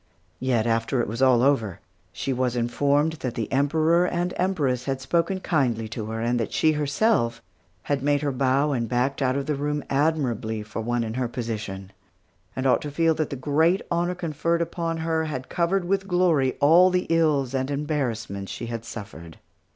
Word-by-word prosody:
Yet, 125 -4 +1
after 115 +2 0
it 120 - 0
was 115 +5 -4
all 125 -2 +5
over, 115 -10 +1 0.3
she 135 - -3
was 125 -1 0
informed 140 +6 +1
that 125 -2 -3
the 110 -3 -3
Emperor 160 +5 +3
and 175 +1 -1
Empress 145 -10 0
had 135 -1 -2
spoken 170 +7 0
kindly 120 -11 0
to 110 -1 -5
her, 110 0 -4
and 120 +1 0
that 115 - -2
she, 160 - +3
herself, 150 - +1 0.4
had 140 -2 -1
made 145 +1 +1
her 145 - 0
bow 135 +3 +1
and 120 -4 -1
backed 130 +3 0
out 130 -1 +1
of 140 - -2
the 150 - 0
room 145 +1 -2
admirably 135 -7 0
for 110 +1 -6
one 120 +1 -1
in 110 -1 -4
her 125 0 -1
position, 105 -5 -5 0.6
and 130 - -3
ought 130 - +3
to 150 - -5
feel 165 +3 +2
that 155 -1 -2
the - - -4
great 155 +7 +2
honor 175 +1 0
conferred 170 0 -1
upon 165 -1 -3
her 160 -1 0
had 130 -4 -5
covered 175 +2 0
with 195 +1 0
glory 170 -8 +2
all 170 +6 +6
the 180 0 0
ills 150 -6 +2
and 130 0 -1
embarrassments 120 -9 -3
she 120 - -5
had 115 -1 -5
suffered. 90 -8 -9
140 Hz, 190 wpm, -25 LUFS, 120-160 Hz, 0.6 s, all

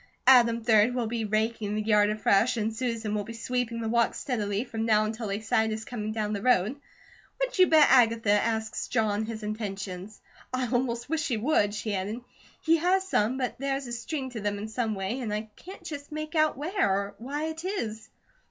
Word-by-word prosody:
Adam, 235 -3 +5
3d, 225 +1 +4
will 245 -2 0
be 225 0 -2
raking 215 0 -1
the 215 - 0
yard 210 -1 +4
afresh 215 +3 +2
and 220 0 -1
Susan 230 -3 -2
will 210 -1 -1
be 230 - -8
sweeping 235 0 -2
the 225 - -2
walks 235 +1 +1
steadily 210 -4 -1
from 225 -3 -4
now 215 -1 +3
until 220 +1 -4
they 200 +1 -2
sight 220 0 +1
us 220 0 -4
coming 215 -3 -4
down 215 -1 -2
the 200 - -3
road. 230 0 +3 0.6
What - - -2
you 370 - +7
bet 310 -2 +7
Agatha 230 -4 +4
asked 220 +2 0
John 220 -2 0
his 225 -1 -6
intentions? 200 -2 -5 0.3
I 255 -1 -1
almost 240 -2 -1
wish 320 +1 -1
she 270 -8 -1
would," 215 -4 +1
she 215 0 -3
added. 200 +5 -3 0.4
"He 330 +1 +4
has 375 +3 +1
some, 235 - +1
but 250 -2 -3
there 275 0 -1
is 275 0 -4
a 240 - -7
string 260 +3 -4
to 235 - -5
them 205 0 -1
in 210 +2 -5
some 220 -1 -1
way, 195 +6 -3
and 235 -5 -3
I 215 +1 -4
can't 375 +3 -11
just 290 -1 -7
make 310 +1 -5
out 310 -3 +2
where, 310 - 0
or 200 +1 -1
why 280 +6 -4
it 320 +1 -7
is." 230 - -4
225 Hz, 210 wpm, -27 LUFS, 215-255 Hz, 0.6 s, you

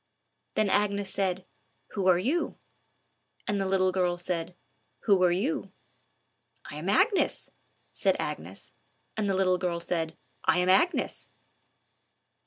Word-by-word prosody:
Then 215 - +2
Agnes 200 -1 +1
said, 185 -1 -1 0.5
"Who 195 -3 -1
are 180 -2 +6
you?" 275 - 0 0.9
And 205 -1 0
the 195 - 0
little 190 -1 +2
girl 180 -1 +1
said, 175 0 -3 0.5
"Who 200 -4 +4
are 180 - +5
you?" 205 - -1 0.9
"I 145 - -7
am 165 +5 -3
Agnes," 390 - +2 0.4
said - - +2
Agnes; - - -6 0.4
and 215 -2 -1
the 195 - +1
little 185 -1 +2
girl 175 -2 -1
said, 165 -2 -2 0.3
"I - - +3
am 180 +1 +2
Agnes." 335 - +2
185 Hz, 130 wpm, -28 LUFS, 180-200 Hz, 0.9 s, are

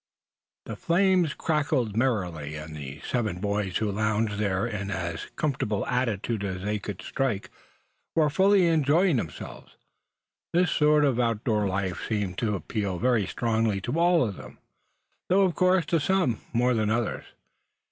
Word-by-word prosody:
THE - - -6
flames 180 -3 +2
crackled 145 -8 0
merrily, 90 - -1
and 75 +1 -8
the 70 -1 -8
seven 110 -7 -1
boys 100 -2 -1
who 105 -2 -1
lounged 105 0 0
there 100 0 0
in 105 -4 -4
as 85 -4 -4
comfortable 115 -9 -1
attitudes 115 -3 -1
as 95 -2 -4
they 105 +1 -1
could 100 -2 -7
strike, 125 -7 -2 0.6
were 155 -2 +3
fully 195 +2 +4
enjoying 160 +1 +3
themselves. 80 -10 -7 0.8
This 180 +1 +3
sort 150 0 +4
of 130 -4 +1
outdoor 115 -3 +1
life 95 -1 -2
seemed 100 -4 -2
to 105 -3 0
appeal 100 -1 -3
very 120 -2 +1
strongly 110 -3 0
to 125 +10 -2
all 175 -2 +4
of 100 - -6
them, - - -11 0.7
though 195 +2 +4
of 185 -3 +2
course 185 -2 +3
to 165 +1 +1
some 145 - +1
more 125 +2 +2
than 110 -2 +1
others. 115 +1 -1
115 Hz, 150 wpm, -26 LUFS, 100-150 Hz, 0.8 s, fully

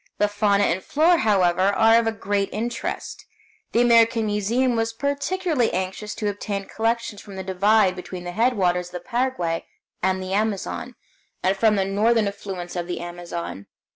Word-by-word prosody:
The 210 - +3
fauna 205 -1 +2
and 185 -1 +1
flora, 330 +3 +3
however, 185 -5 +2
are 220 +4 +4
of 225 -2 -2
great 200 0 0
interest. 235 +2 -4 0.5
The 235 - +3
American 230 -1 +4
Museum 225 +5 +1
was 225 0 -1
particularly 285 +2 0
anxious 190 +3 -3
to 210 - -2
obtain 200 -1 -3
collections 225 -1 -2
from 200 -2 -11
the 190 - -5
divide 195 +1 +3
between 180 0 -7
the 175 - -5
headwaters 185 -5 +1
of 180 - -16
the 180 - -4
Paraguay 240 -10 -1 0.3
and 190 +1 +1
the 185 0 -4
Amazon, 210 -1 -2 0.5
and 190 +1 +2
from 215 +1 +3
the 195 - +2
southern 210 +3 +2
affluents 190 -3 -6
of 175 -1 -3
the 175 -1 -3
Amazon. 175 - -6
205 Hz, 165 wpm, -23 LUFS, 185-230 Hz, 0.5 s, are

